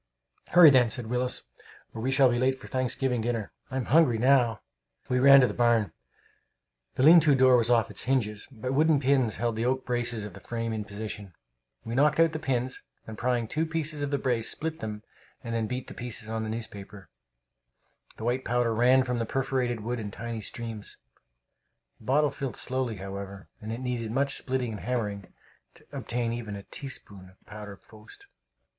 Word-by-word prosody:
"Hurry, 175 -4 +9
then," 125 -3 +5
said 120 +1 0
Willis, 125 +2 -2 0.5
"or 110 - -6
we 130 - -1
shall 135 0 +5
be 120 - 0
late 130 +1 +1
to - - -11
Thanksgiving 130 -1 0
dinner! 115 -3 -2 0.2
I'm 130 -2 -2
hungry 140 -4 +4
now!" 120 -3 +3 0.5
We 125 - +2
ran 140 +1 +8
to 125 - +4
the - - -4
barn. 115 -5 +2 1.0
The 130 - +1
lean 165 +4 +9
to 150 -3 +4
door 130 -1 +6
was 120 -1 +2
off 115 -2 +3
its - - -5
hinges, 110 -5 -1
but 125 +1 -4
wooden 155 +1 +4
pins 130 -5 +2
held 115 -1 -1
the 115 +2 -1
oak 130 +1 -1
braces 120 -3 -1
of 105 - -9
the - - -11
frame 115 -1 -4
in 110 -1 -4
position. 105 -3 -7 0.5
We 115 - -5
knocked 145 +4 +3
out 165 -1 +5
the 155 - -4
pins, 130 -4 -2 0.2
and 110 - -8
prying 120 +1 0
out 110 - -9
two 155 - -1
of 155 -3 -2
the 140 - 0
braces, 120 -4 -1
split 160 0 -5
them, 105 -1 -6 0.4
and 115 - -5
then 115 -1 -1
beat 125 +2 -4
the - - -10
pieces 120 -2 -5
on 110 0 -2
the 110 - -3
newspapers. 100 -3 -8 1.1
The - - -8
white 125 +3 0
powder 120 -1 +1
ran 125 +3 +4
from 125 -1 -2
the 115 - -2
perforated 130 -3 -1
wood 120 +2 -3
in 105 -2 -5
tiny 115 +2 -6
streams. 115 -2 -7 1.0
The - - -17
bottle 145 +3 +3
filled 135 -3 -5
slowly, 130 -3 -2
however, 100 0 -8
and 110 +1 -6
it 115 +3 -5
needed 120 -3 -3
much 140 +3 +1
splitting 130 -3 -2
and 105 - -6
hammering 105 -6 -3 0.4
to - - -17
obtain 120 -1 -3
even 115 -3 -5
a 100 - -8
teaspoonful 100 -8 -9
of - - -36
powder 105 -1 -9
post. 110 - -17
120 Hz, 195 wpm, -28 LUFS, 110-130 Hz, 1.1 s, Hurry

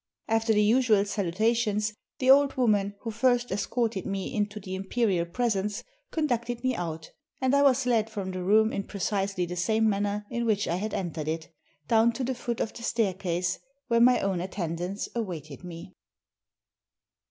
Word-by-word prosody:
After 225 0 +2
the 210 -1 +4
usual 220 -2 +4
salutations 210 +2 0 0.2
the 260 0 +5
old 280 0 +5
woman 205 -5 +2
who 225 - -4
first 245 +2 +2
escorted 205 0 -1
me 195 +4 -3
into 210 -2 -1
the 190 -2 -7
imperial 190 -2 0
presence 210 0 -1 0.3
conducted 245 -6 -1
me 255 -1 +1
out, 160 -3 -5 0.3
and 260 0 +1
I 280 - +5
was 270 -2 +4
led 225 -3 +2
from 200 -4 -4
the 185 0 -4
room 215 +4 +4
in 200 - -2
precisely 195 -2 -1
the 175 +1 -5
same 220 +5 +2
manner 205 0 0
in 235 -1 -1
which 205 -2 +1
I 170 - 0
had 215 +3 -3
entered 165 -5 -3
it, 160 +1 -3 0.4
down 230 +1 +4
to 255 - -3
the 260 +1 -1
foot 240 -2 -4
of 225 - -2
the - - -10
staircase, 185 -6 -1 0.3
where 235 0 +4
my 250 +1 +6
own 190 -3 0
attendants 180 +1 -3
awaited 170 - -5
me. 175 +1 -9
210 Hz, 170 wpm, -27 LUFS, 190-235 Hz, 0.4 s, my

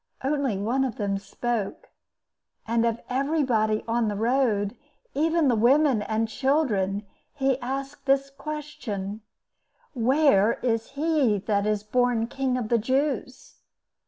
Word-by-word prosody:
Only 270 -6 0
one 235 +7 0
of 255 -4 -2
them 200 -1 -1
spoke, 220 +1 -4 0.8
and 230 +1 +2
of 230 0 -2
everybody 255 -6 +1
on 230 0 +1
the 205 - -1
road, 225 -2 +1 0.4
even 320 +2 +2
the 245 - +3
women 255 +1 +4
and 220 +2 -1
children, 220 -7 0 0.3
he 270 -2 +1
asked 275 +3 -5
this 275 0 +2
question—'Where 260 - -1
is 225 -2 0
he 290 -7 +2
that 205 -1 +1
is 210 -1 0
born 245 +1 +1
King 260 +1 -1
of 230 -4 -3
the 235 - +3
Jews? 260 +2 -2
245 Hz, 125 wpm, -26 LUFS, 215-275 Hz, 0.8 s, women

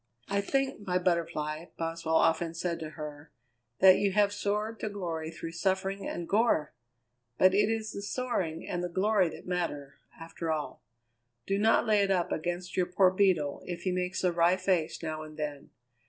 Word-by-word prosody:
"I 200 0 +1
think, 270 +5 -1
my 180 0 +2
Butterfly," 165 -3 -1
Boswell 165 0 -2
often 165 +1 +2
said 170 0 -2
to 160 -2 -5
her, 150 0 -8 0.5
"that 190 0 +8
you 200 -1 +1
have 205 0 +3
soared 210 +2 -2
to 215 - -2
glory 170 -6 -4
through 165 0 -7
suffering 190 +3 -1
and 170 - -4
gore! 205 -8 +2 0.6
But 185 0 +5
it 205 +2 +3
is 220 -1 -2
the 200 - -6
soaring 200 -8 -2
and 175 0 -2
the 180 - -2
glory 190 0 +2
that - - -11
matter, 165 -6 -3 0.2
after 165 0 -4
all. 155 -2 -3 0.6
Do 195 0 0
not 220 +3 +4
lay 215 -2 +4
it 200 - +1
up 180 -3 +1
against 175 +2 -3
your 180 -1 +1
poor 180 +1 +4
Beetle 185 -7 +2
if 175 -1 -5
he 185 - 0
makes 180 +1 -2
a 180 - +3
wry 170 +1 +4
face 185 -4 0
now 155 -1 -3
and 155 0 -10
then. 150 -2 -5
180 Hz, 185 wpm, -30 LUFS, 165-200 Hz, 0.6 s, that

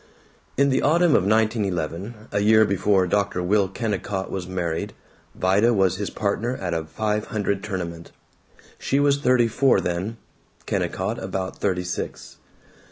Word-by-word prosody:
In 140 +1 +4
the 130 - +2
autumn 170 +2 +3
of 95 - +3
1911, 105 -1 -1
a 100 - 0
year 110 +1 +5
before 100 -1 +2
Dr. 100 -1 0
Will 100 +2 +2
Kennicott 95 -2 -3
was 90 -2 -4
married, 85 -3 -3 0.4
Vida 100 +6 +3
was 95 -2 +2
his 100 0 -3
partner 110 +4 -1
at 90 -2 -3
a 80 -1 -2
five 105 +5 -2
hundred 100 -2 -2
tournament. 85 -4 -5 0.7
She 135 - 0
was 140 0 +3
thirty 125 -4 +3
four 130 +4 +3
then; 95 +6 -3 0.5
Kennicott - - -2
about 95 -1 -4
thirty 90 -3 0
six. 90 - -6
100 Hz, 145 wpm, -23 LUFS, 95-110 Hz, 0.7 s, year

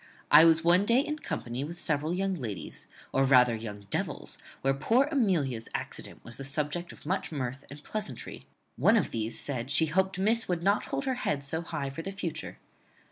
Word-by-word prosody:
I 150 +2 +10
was 165 0 +5
one 175 +3 +5
day 235 +4 +4
in 300 +2 -2
company 120 - -4
with 170 +4 -7
several 155 -1 0
young 195 +2 0
ladies, 120 - -5 0.3
or 135 - +3
rather 125 -3 +6
young 105 -2 -6
devils, - - -2 0.2
where 135 0 +3
poor 230 - +3
Amelia's 160 - +1
accident - - -6
was 120 - -7
the 135 - -6
subject 150 +5 -2
of - - -14
much 185 +3 -1
mirth 130 -2 -4
and 145 +1 -11
pleasantry. 195 - -4 0.3
One - - +5
of - - 0
these 110 0 -2
said 130 -3 -3
she 160 +3 +4
hoped 190 +4 +1
miss 220 +4 +2
would 175 -2 -1
not 200 +2 +2
hold - - -3
her 265 - +1
head 140 -2 -1
so 160 +4 -2
high 140 -4 -4
for 165 - -6
the 195 - -5
future. 190 -5 -5
155 Hz, 195 wpm, -29 LUFS, 135-190 Hz, 0.3 s, I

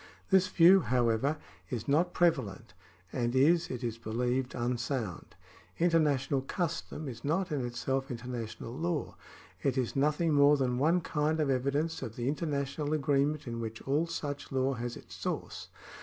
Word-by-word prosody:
^ - - -19 0.3
This 190 -1 +5
view, 185 +1 +7
however, 125 0 +1 0.3
is 120 -4 -4
not 165 +5 +3
prevalent, 130 - 0 0.4
and 120 0 -1
is, 165 +6 +4
it 125 0 -5
is 115 -1 -3
believed, 125 +3 -1
unsound. 120 - -3 0.4
International 150 -5 +2
custom 160 0 -3
is 120 -3 -7
not 175 +5 0
in 140 -4 -1
itself 135 +2 -2
international 120 -2 -5
law; 160 +2 -2 0.5
it 135 -1 0
is 125 -3 -1
nothing 150 +3 +2
more 145 0 +6
than 125 -2 0
one 165 +6 +3
kind 155 0 0
of 145 -3 +2
evidence 140 +5 0
of 115 - -6
the 120 0 -3
international 145 0 -1
agreement 145 0 +1
in 115 -2 -4
which 110 -1 -5
all 150 +5 +1
such 145 -4 -5
law 135 0 +1
has 120 0 -4
its - - -13
source. - - -4
140 Hz, 155 wpm, -31 LUFS, 125-155 Hz, 0.5 s, view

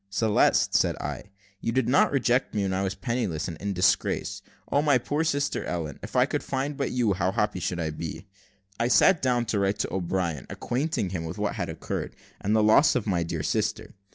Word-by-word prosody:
"Celeste," 105 +2 +2
said - - +3
I, - - -5 0.3
"you 115 - -2
did 130 +2 +1
not 135 - +4
reject 125 -3 +1
me 105 - +1
when 95 -1 -1
I 95 - 0
was 95 -1 -2
penniless, 115 -10 -2
and 85 - -5
in 100 +4 -3
disgrace. 90 -1 +1 0.3
O 145 - +3
my 145 -3 +4
poor 145 +6 -1
sister 145 -3 0
Ellen! 80 -5 -4
if - - -9
I - - +5
could - - -2
but - - -15
find 140 +1 -1
you, 120 -5 +1
how 95 0 0
happy 95 -1 0
should 90 0 -2
I 80 -2 -1
be!" 80 +5 -6 0.5
I 115 - +2
sat 170 +7 +5
down 125 -2 +1
to 110 -2 -1
write 100 +1 +1
to - - -2
O'Brien, 85 -6 -2
acquainting 130 - -2
him 90 -4 -3
with 80 - -6
all - - -1
that - - -1
had - - -2
occurred, - - -5 0.3
and 105 +2 +2
the 110 - +4
loss 110 +8 +5
of 125 - 0
my 90 -5 +1
dear 85 -2 -3
sister. 110 +4 -1
105 Hz, 220 wpm, -26 LUFS, 90-125 Hz, 0.5 s, I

